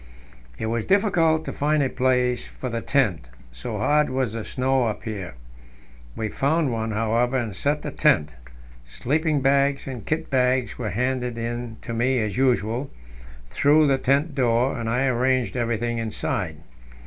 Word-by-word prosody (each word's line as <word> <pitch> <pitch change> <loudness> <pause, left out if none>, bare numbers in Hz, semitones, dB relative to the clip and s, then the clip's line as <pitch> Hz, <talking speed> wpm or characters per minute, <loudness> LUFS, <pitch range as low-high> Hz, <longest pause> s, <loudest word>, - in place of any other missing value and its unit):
It - - -3
was 115 0 -1
difficult 165 -6 +2
to - - -4
find 150 0 +1
a - - +2
place 125 -1 +1
for 130 - -6
the 115 -1 -3
tent, 105 - 0 0.2
so - - -5
hard 150 0 +2
was 130 -4 -1
the 115 -1 -4
snow 130 0 0
up 110 - -4
here. 100 - -6 0.8
We 110 - -2
found 145 +5 +1
one, 110 0 -2
however, 115 +4 +1
and 115 -6 -3
set 145 +7 -1
the - - -4
tent. 75 0 +2 0.5
Sleeping 145 - -1
bags 140 +1 +2
and 125 -5 -6
kit 155 +9 -3
bags 125 -3 +1
were 110 -4 -2
handed 125 +3 -1
in 120 0 -4
to 115 - -5
me, 125 +3 +1
as 110 -3 -1
usual, 125 0 +1 0.6
through 145 - +3
the 135 -2 +2
tent 140 +4 +1
door, 125 -1 +2
and 115 -1 -2
I 125 +4 +1
arranged 130 0 +1
everything 120 -1 -1
inside. 115 -1 -3
125 Hz, 160 wpm, -24 LUFS, 115-135 Hz, 0.8 s, through